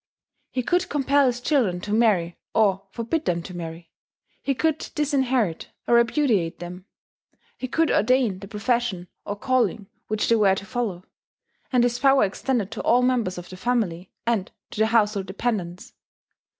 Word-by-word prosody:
He 255 - -2
could 355 +7 +1
compel 280 -1 +3
his 245 -1 0
children 245 - +1
to 205 - -4
marry 200 -7 +2 0.2
or 195 -3 +2
forbid 235 +10 -2
them 170 -1 0
to 180 - -9
marry; 165 -1 -7 0.5
he 275 - -1
could 315 +2 0
disinherit 265 - 0 0.2
or - - +2
repudiate 235 - +2
them; 180 +1 -8 0.7
he 255 - -5
could 320 +5 +1
ordain 240 -4 +2
the 195 - -9
profession 210 -3 -1 0.2
or 205 - -3
calling 240 -2 0 0.2
which 215 0 -1
they 230 - +4
were 200 -3 +4
to 195 - -6
follow; 205 -7 -3 0.7
and 250 -2 +4
his 245 0 +1
power 270 -1 +5
extended 210 +1 -1
to - - -4
all 245 +1 +3
members 240 -8 +1
of 175 0 -8
the 185 - -8
family, 190 -5 -1
and 225 -5 0 0.2
to - - -7
the 220 - +4
household 210 -4 +2
dependents. 190 -3 -3
225 Hz, 165 wpm, -24 LUFS, 190-255 Hz, 0.7 s, power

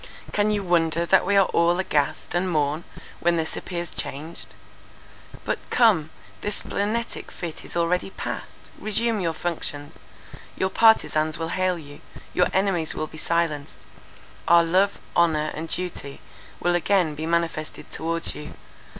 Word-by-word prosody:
"Can 210 0 +2
you 205 -1 0
wonder 170 -2 +2
that 190 +2 +4
we 200 0 +4
are 195 - +7
all 170 +1 +3
aghast 150 -7 0
and 180 +1 +1
mourn, 150 0 0 0.3
when 170 0 +2
this 160 -1 -2
appears 175 -2 -4
changed? 155 +5 -6 0.9
But, - - -1
come, 200 -11 +4 0.3
this 205 0 -1
splenetic 220 +4 -2
fit 170 -3 -6
is - - -6
already 170 +2 +1
passed; - - -7
resume 225 +1 +1
your 165 -3 -1
functions; 150 -4 -3 0.6
your 190 0 0
partizans 155 -9 +4
will 165 0 -3
hail 185 0 +1
you; 145 -3 -11 0.3
your 180 - +4
enemies 190 -5 +1 0.2
be 155 - -9
silenced; 155 - -1 0.7
our 170 0 +7
love, 185 +4 +2 0.2
honour, 160 -3 +3
and 160 +1 -5
duty 175 -6 -4 0.4
will 175 - +2
again 175 -2 +2
be 155 +2 -4
manifested 165 -2 -2
towards 165 +1 -2
you. 150 - -8
170 Hz, 140 wpm, -25 LUFS, 160-190 Hz, 0.9 s, are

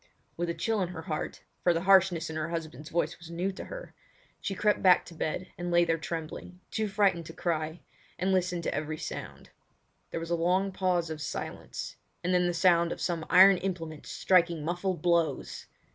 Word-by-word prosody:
With 175 0 -2
a 170 - -2
chill 225 -3 0
in 180 - +1
her 165 -2 -7
heart—for 165 +2 -2
the 165 - 0
harshness 190 -3 +5
of - - -6
her 155 +1 -2
husband's 155 -3 -5
voice 170 - -1
was 170 -1 -11
new 175 +3 -1
to 190 - -8
her—she - - -9
crept 210 +2 +2
back 185 -2 +6
to 175 - -11
bed 165 +3 -3
and 175 0 -3
lay 175 0 +4
there 165 -1 +1
trembling, 165 +2 -6
too 220 -1 0
frightened 195 -5 +2
to 165 - -8
cry, 160 -1 -2 0.4
and 185 +2 0
listened 180 -2 +1
to - - -1
every 155 +1 -3
sound. - - -7 0.6
There - - -3
was 165 +1 -6
a - - +3
long 180 +4 +1
pause 180 -3 0
of 155 -1 -5
silence, - - -5 0.3
and 180 +2 +1
then 180 0 +3
the 175 - 0
sound 170 -1 +4
of - - -4
some 170 -3 -2
iron 190 +1 +8
implement 165 -5 -4
striking 170 -4 +2
muffled 175 0 -2
blows! 170 -2 0
175 Hz, 190 wpm, -29 LUFS, 165-185 Hz, 0.6 s, iron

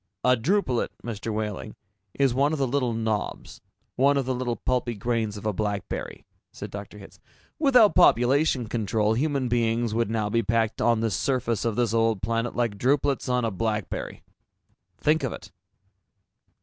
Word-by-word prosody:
"A 125 0 +5
drupelet, 130 - 0 0.2
Mr. 115 -1 -4
Wehling, 105 0 -4 0.4
is 135 -3 +2
one 140 +4 +2
of - - -1
the 135 - +1
little 130 -1 0
knobs, 110 -2 -3 0.4
one 140 +2 +4
of 135 - 0
the 130 - -1
little 125 -1 -2
pulpy 125 -2 -1
grains 110 -1 -2
of 105 - -9
a 105 - 0
blackberry," 105 -1 -4 0.3
said - - -8
Dr. 100 0 -8
Hitz. 100 - -14 0.4
"Without 250 -8 +5
population 135 -4 +4
control, 110 -1 0
human 140 +1 0
beings 115 -1 0
would 115 -1 0
now 110 -2 -1
be 115 +3 +1
packed 115 0 0
on 115 -2 +3
this 110 -5 0
surface 120 -2 -1
of 115 -2 0
this 120 -2 0
old 115 -4 +1
planet 115 +3 -1
like 115 -5 -1
drupelets 135 +1 +1
on 125 -1 +1
a 115 - -1
blackberry! 105 0 -3 0.8
Think 155 +1 +2
of 130 -4 -2
it!" - - -11
115 Hz, 165 wpm, -25 LUFS, 110-130 Hz, 0.8 s, A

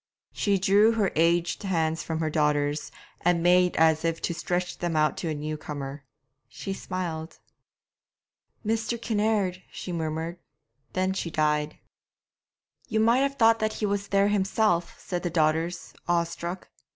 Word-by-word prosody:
She 200 -2 +1
drew 200 +4 +4
her 215 -4 +1
aged 170 +2 +2
hands 165 -4 0
from 160 0 -3
her 160 - 0
daughters', 150 -1 +1 0.3
and 175 -1 +2
made 180 0 +4
as 160 0 +4
if 165 0 0
to 170 - 0
stretch 175 +1 -2
them 175 -2 -1
out 155 0 +3
to 170 - -3
a 155 - -2
new 155 +1 -4
comer. 145 -2 -6 0.4
She 150 +9 -5
smiled. 170 -4 -5 1.3
'Mr. 225 +2 -1
Kinnaird!' 210 -5 0
she 180 - -6
murmured; 165 +1 -3 0.5
then 185 +1 +1
she 185 -3 -3
died. 150 -1 0 1.1
'You 220 - 0
might 230 +3 +4
have 275 0 +1
thought 225 -3 +5
that 215 0 0
he 215 - -2
was 200 0 -1
there 200 0 +3
himself,' 195 -3 +1
said 180 -2 -4
the 175 - -2
daughters, 160 +1 0 0.2
awestruck. 170 +1 -1
175 Hz, 150 wpm, -27 LUFS, 160-200 Hz, 1.3 s, thought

